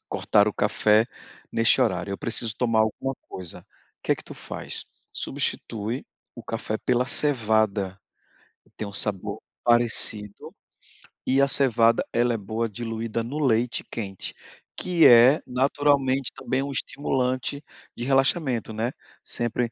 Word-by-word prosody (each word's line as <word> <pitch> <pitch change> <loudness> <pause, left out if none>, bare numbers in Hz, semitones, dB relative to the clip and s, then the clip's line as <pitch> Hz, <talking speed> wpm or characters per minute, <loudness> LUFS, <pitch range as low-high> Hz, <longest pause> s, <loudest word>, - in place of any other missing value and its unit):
cortar 105 +1 +2
o - - -3
café 105 +2 +2 0.5
neste - - +4
horário, - - 0
eu 100 - -4
preciso 115 -2 -2
tomar 115 -3 +1
alguma 110 +5 -1
coisa". 90 -3 -6 0.4
Que - - +1
que - - -13
tu - - -9
faz? - - -6 0.3
Substitui 115 +4 -1 0.3
o 120 - -10
café 110 -1 -3
pela 125 +2 0
cevada, 110 -9 +1 0.8
tem 110 - -5
um 100 - -7
sabor 100 -2 0 0.2
parecido 115 -3 +2 0.7
e 135 +1 +3
a 140 - +4
cevada, 115 -4 +3
ela 120 0 +2
é - - -2
boa 110 +3 -3
diluída 115 +1 -4
no 140 +6 -5
leite 120 -1 +1
quente, 100 -4 -6 0.4
que 175 -2 +4
é 125 +5 +7
naturalmente 135 0 +1
também 130 +1 -2
um 140 - -4
estimulante 135 0 -1 0.3
de 120 - -5
relaxamento, 135 - +1
né. 110 +3 -2 0.3
Sempre 120 0 -2
120 Hz, 130 wpm, -24 LUFS, 110-130 Hz, 0.8 s, é